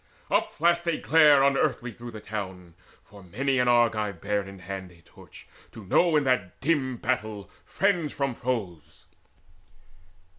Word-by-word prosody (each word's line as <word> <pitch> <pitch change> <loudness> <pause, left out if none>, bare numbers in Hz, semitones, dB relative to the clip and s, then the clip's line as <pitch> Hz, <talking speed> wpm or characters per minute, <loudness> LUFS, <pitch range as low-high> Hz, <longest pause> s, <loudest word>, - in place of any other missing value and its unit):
Upflashed 170 +2 +1
a 155 - -2
glare 150 -4 +5
unearthly 135 -3 +1
through 120 +2 -10
the 110 -2 -9
town, 95 -5 -7 0.3
For 100 0 -16
many 130 +9 -1
an 125 - +2
Argive 110 -6 +2
bare 105 +2 -1
in 95 0 -10
hand 95 0 -7
a 85 - -20
torch - - -16 0.3
To 110 - -11
know 165 - +3
in 150 - +3
that 125 -9 -1
dim 130 -4 0
battle 110 -4 -3
friends 180 -6 0
from 140 -2 -2
foes. 110 - -5
120 Hz, 145 wpm, -26 LUFS, 100-140 Hz, 0.3 s, glare